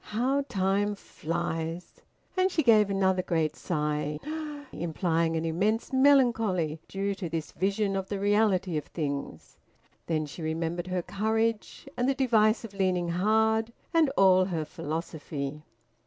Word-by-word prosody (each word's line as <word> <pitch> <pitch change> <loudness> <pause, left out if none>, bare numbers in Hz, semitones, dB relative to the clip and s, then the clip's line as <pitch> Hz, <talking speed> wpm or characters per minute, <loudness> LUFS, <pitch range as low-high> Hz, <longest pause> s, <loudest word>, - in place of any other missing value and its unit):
How 260 +6 0
time 200 +2 +1
flies!" 165 -1 -4 0.3
And 370 0 +3
she 330 -4 0
gave 215 -4 +5
another 190 -1 +2
great 160 -4 0
sigh, 150 -2 -2 0.5
implying 165 0 0
an 160 - -2
immense 205 +10 0
melancholy 225 - +3
due 200 +1 -2
to 190 -3 -5
this 160 -2 -4
vision 195 +2 0
of 190 0 -3
the 200 - -2
reality 200 -4 +2
of 150 - -3
things. 145 -4 -5 0.5
Then 155 -2 0
she 150 +3 -9
remembered 165 +2 -2
her 180 -1 -2
courage, 220 +6 -1
and 245 +2 +1
the 275 - +1
device 225 -5 +3
of 225 -3 -8
leaning 185 -3 0
hard, 220 +5 +2 0.2
and 325 -3 +4
all 185 -1 +6
her 165 -4 -2
philosophy. 150 -3 -5
190 Hz, 140 wpm, -28 LUFS, 165-215 Hz, 0.5 s, all